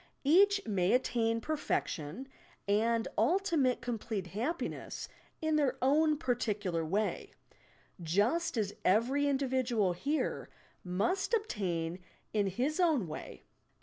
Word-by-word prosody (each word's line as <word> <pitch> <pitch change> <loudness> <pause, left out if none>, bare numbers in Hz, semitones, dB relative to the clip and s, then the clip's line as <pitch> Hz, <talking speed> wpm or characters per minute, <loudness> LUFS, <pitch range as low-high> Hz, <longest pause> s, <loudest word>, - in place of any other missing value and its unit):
Each 400 +7 +5
may 190 -3 +1
attain 230 -2 +1
perfection 245 - -2 0.4
and 225 +3 +2
ultimate 290 - +2
complete 225 -5 -3
happiness 275 - -3 0.4
in 315 -1 +2
their 285 -4 +1
own 300 +3 +3
particular 210 - -1
way, 200 +7 -1 0.4
— - - -24 0.2
just 255 +8 +2
as 205 -2 0
every 245 +9 +3
individual 255 -8 +1
here 285 - -2 0.3
must 285 - 0
obtain 180 - -2
it - - -25 0.3
in 205 -2 +2
his 255 - -1
own 310 - +3
way. 155 - -8
240 Hz, 115 wpm, -32 LUFS, 205-300 Hz, 0.4 s, Each